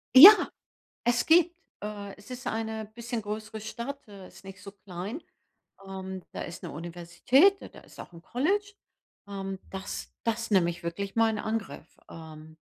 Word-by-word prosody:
Ja, 350 +11 +14 0.7
es 240 0 +2
gibt, 345 +1 +5 0.3
äh 205 -1 -6
es 205 - -16
ist 250 -1 -7
eine 220 0 -3
bisschen 235 -1 -4
größere 215 +1 -5
Stadt, 235 +6 -6
äh, 200 -3 -11
ist - - -16
nicht 195 0 -10
so 200 - -9
klein. 200 - -7 0.6
Ähm, 190 -1 -6
da - - -5
ist 170 0 -8
'ne - - -5
Universität, 175 - +3
da - - -8
da - - -14
ist - - -17
auch - - -9
'n 165 - -12
College. 400 - 0 0.5
Ähm, 195 -1 -5
das 190 0 -6
das 230 -1 -1
nehme 180 -4 +4
ich 175 +1 -7
wirklich 195 +5 -4
mal 225 0 +4
in 215 - -3
Angriff, 210 -8 -4
ähm. 160 -1 -11
205 Hz, 170 wpm, -28 LUFS, 185-235 Hz, 0.7 s, Ja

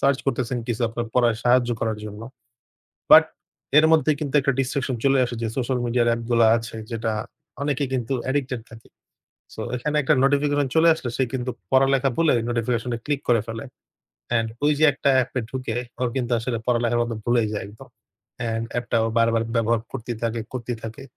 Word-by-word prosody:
Search 140 0 +3
করতেছেন 125 -2 -1
কিছু 120 +1 -2
আপনার 115 +1 -4
পড়ায় 120 -3 +3
সাহায্য 120 0 +4
করার 110 -1 -1
জন্য। 105 0 -8 0.9
বাট - - +10 0.5
এর 155 - +7
মধ্যে 155 -1 +4
কিন্তু 150 -1 -3
একটা 140 - +2
ডিসট্রাকশন 135 0 -1
চলে 135 0 +4
আসে 120 0 -5
যে 115 - -1
সোশ্যাল 130 0 0
মিডিয়ার 120 0 +1
অ্যাপ 115 0 0
গুলা 115 -1 +5
আছে 115 0 -7 0.2
যেটা, 115 0 -2 0.5
অনেকেই 140 -1 0
কিন্তু 125 0 -1
অ্যাডিক্টেড 130 -3 -1
থাকে। 115 0 -14 0.7
সো, - - -8 0.2
এখানে 150 +5 -2
একটা 145 +3 +3
নোটিফিকেশন 145 0 +2
চলে 165 +1 +6
আসলে 130 -6 -5
সে 135 - +1
কিন্তু 130 -1 -2 0.2
পড়ালেখা 135 0 +4
ভুলে 165 -2 +3
ঐ - - 0
নোটিফিকেশন-এ 120 0 -1
ক্লিক 145 -2 -1
করে 120 -2 +4
ফেলে। 115 +2 -6 0.7
অ্যান্ড 115 -1 +1 0.2
ওই 150 - +4
যে 155 - +4
একটা 140 - -1
app-এ 125 +1 -3
ঢুকে 125 -4 -4 0.2
ওর 125 - +1
কিন্তু 125 -2 -1
আসলে 115 +1 -2
পড়ালেখার 120 -1 +1
কথা 115 -2 -3
ভুলেই 120 -2 +2
যায় 105 - -3
একদম। 105 +2 -14 0.5
অ্যান্ড 115 -1 -2
app-টা 120 0 -2
ও - - +1
বারবার 115 0 +3
ব্যবহার 115 0 +2
করতেই 120 0 -5
থাকে, 115 0 -1
করতেই 120 -2 -4
থাকে। 110 0 -7
120 Hz, 185 wpm, -23 LUFS, 115-135 Hz, 0.9 s, বাট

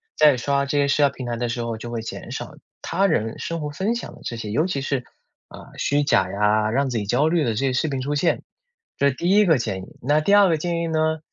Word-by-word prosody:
在 150 -4 +5
刷 140 +3 0
这 140 +1 -1
些 140 0 +3
社 145 +1 +2
交 140 - +5
平 130 -1 -8
台 120 -1 -2
的 120 +1 -2
时 120 +1 -3
候， 115 -1 -3
就 120 +2 -7
会 115 -1 -3
减 110 - -7
少 - - -6 0.3
他 195 +4 +1
人 115 - -1
生 165 0 -3
活 150 -1 -4
分 190 +10 -1
享 240 - -6
的 - - -17
这 115 - -5
些 110 -2 -5
尤 150 +9 +2
其 160 -7 -2
是， 135 -1 -2 0.5
啊， - - -12
虚 145 +1 +1
假 95 -9 +2
呀， 105 +1 +2
让 135 +3 +1
自 120 - -2
己 105 - -2
焦 125 +9 +2
虑 165 -1 +2
的 120 - 0
这 - - -5
些 135 +1 0
视 140 +5 0
频 135 -2 -2
出 145 +3 -2
现。 155 +4 +1 0.6
这 140 - +3
是 135 - 0
第 170 +6 -1
一 205 +2 +5
个 160 -5 +4
建 95 -6 -3
议。 - - -14
那 145 +5 +2
第 175 +6 +2
二 200 -2 +6
个 165 - +2
建 170 +2 -2
议 170 - -1
呢， 160 0 0
140 Hz, 300 characters per minute, -23 LUFS, 120-160 Hz, 0.6 s, 二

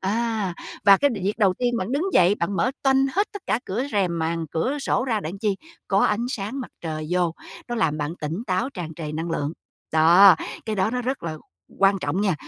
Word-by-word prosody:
À, 215 -2 -1 0.3
và 200 -1 +8
cái 285 +7 +2
việc 200 0 -1
đầu 195 -4 +3
tiên 245 +3 0
bạn 220 +2 -3
đứng 285 +5 0
dậy, 185 +2 +5
bạn 195 +1 -2
mở 250 - +2
toanh 270 0 +4
hết 405 +3 +2
tất 405 -2 -8
cả 225 - +1
cửa 220 +7 -2
rèm, 185 -4 +1
màn 165 0 -1
cửa 255 - -1
sổ 265 -2 0
ra 225 -5 0
đặng 180 +2 -6
chi? 205 -2 0 0.3
Có 195 - +3
ánh 225 +3 +1
sáng 225 +3 -4
mặt 250 - -7
trời 155 -2 -4
vô, 175 -2 +1 0.3
nó 240 - -2
làm 160 -9 0
bạn 150 +3 -3
tỉnh 160 +8 -4
táo, 200 +8 0
tràn 170 - -6
trề 155 -2 -6
năng 165 +2 -3
lượng. 145 -2 -2 0.4
Đó, 170 +4 +7 0.3
cái 215 -1 -2
đó 190 +2 +1
nó 250 +1 -2
rất 260 +2 -3
là 160 -2 -4 0.4
quan 195 0 +4
trọng 145 +6 -1
nha. 200 -4 +2
195 Hz, 225 wpm, -24 LUFS, 170-235 Hz, 0.4 s, và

